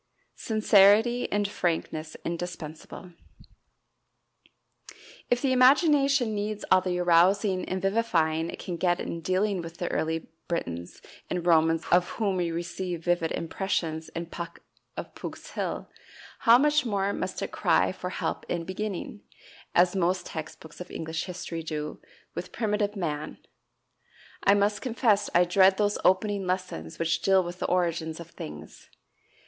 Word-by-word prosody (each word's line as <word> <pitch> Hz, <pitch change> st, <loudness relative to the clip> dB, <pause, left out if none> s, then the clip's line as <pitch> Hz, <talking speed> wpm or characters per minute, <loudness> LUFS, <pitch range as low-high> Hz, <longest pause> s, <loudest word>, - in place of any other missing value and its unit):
Sincerity 215 Hz, +2 st, +4 dB
and 205 Hz, 0 st, +1 dB
Frankness 160 Hz, -4 st, -2 dB
Indispensable. 170 Hz, 0 st, -6 dB, 2.2 s
If 245 Hz, +1 st, +1 dB
the 270 Hz, -, +2 dB
imagination 275 Hz, -2 st, +4 dB
needs 210 Hz, 0 st, -3 dB
all 185 Hz, -, +7 dB
the 180 Hz, -1 st, -1 dB
arousing 185 Hz, +2 st, +3 dB
and 185 Hz, -, -1 dB
vivifying 170 Hz, -6 st, +1 dB
it -, -, -6 dB
can 175 Hz, -2 st, -5 dB
get 175 Hz, +1 st, +1 dB
in 170 Hz, -, -4 dB
dealing 185 Hz, +2 st, 0 dB
with 165 Hz, 0 st, -9 dB
the 175 Hz, -, -3 dB
early 160 Hz, 0 st, -2 dB, 0.2 s
Britons 85 Hz, -, -4 dB, 0.3 s
and 175 Hz, -1 st, -2 dB
Romans 165 Hz, -1 st, +3 dB
of 175 Hz, 0 st, +4 dB
whom 200 Hz, -4 st, 0 dB
we 175 Hz, -2 st, 0 dB
receive 175 Hz, 0 st, -4 dB
vivid 175 Hz, -2 st, +1 dB
impressions 165 Hz, -2 st, -2 dB
in 170 Hz, +1 st, -5 dB
"Puck 170 Hz, 0 st, -8 dB, 0.4 s
of -, -, -6 dB
Pook's -, -, -8 dB
Hill," -, -, -3 dB, 0.5 s
how 230 Hz, +1 st, +7 dB
much 295 Hz, +2 st, +3 dB
more 200 Hz, -4 st, 0 dB
must -, -, -3 dB
it -, -, -4 dB
cry -, -, +2 dB
for -, -, -6 dB
help -, -, -3 dB
in 170 Hz, -1 st, -1 dB
beginning, 205 Hz, +2 st, -5 dB, 0.5 s
as 175 Hz, +2 st, +4 dB
most 180 Hz, 0 st, +1 dB
text 160 Hz, -1 st, -7 dB
books 160 Hz, +2 st, -12 dB
of 180 Hz, -, -8 dB
English 160 Hz, 0 st, -4 dB
history 175 Hz, -2 st, -5 dB
do, 150 Hz, -1 st, -5 dB, 0.3 s
with -, -, -6 dB
primitive 210 Hz, -2 st, -1 dB
man! 155 Hz, -5 st, -3 dB, 1.1 s
I 200 Hz, -, +5 dB
must 205 Hz, +1 st, +1 dB
confess 225 Hz, -4 st, +1 dB
I 175 Hz, -, +7 dB
dread 190 Hz, +2 st, +4 dB
those 205 Hz, -1 st, +1 dB
opening 195 Hz, +1 st, +2 dB
lessons 180 Hz, -, -3 dB
which 165 Hz, 0 st, 0 dB
deal 190 Hz, -1 st, +4 dB
with 175 Hz, +1 st, -7 dB
the -, -, -1 dB
origins 170 Hz, -3 st, 0 dB
of 170 Hz, 0 st, -10 dB
things. 75 Hz, 0 st, -10 dB
180 Hz, 145 wpm, -27 LUFS, 165-205 Hz, 2.2 s, all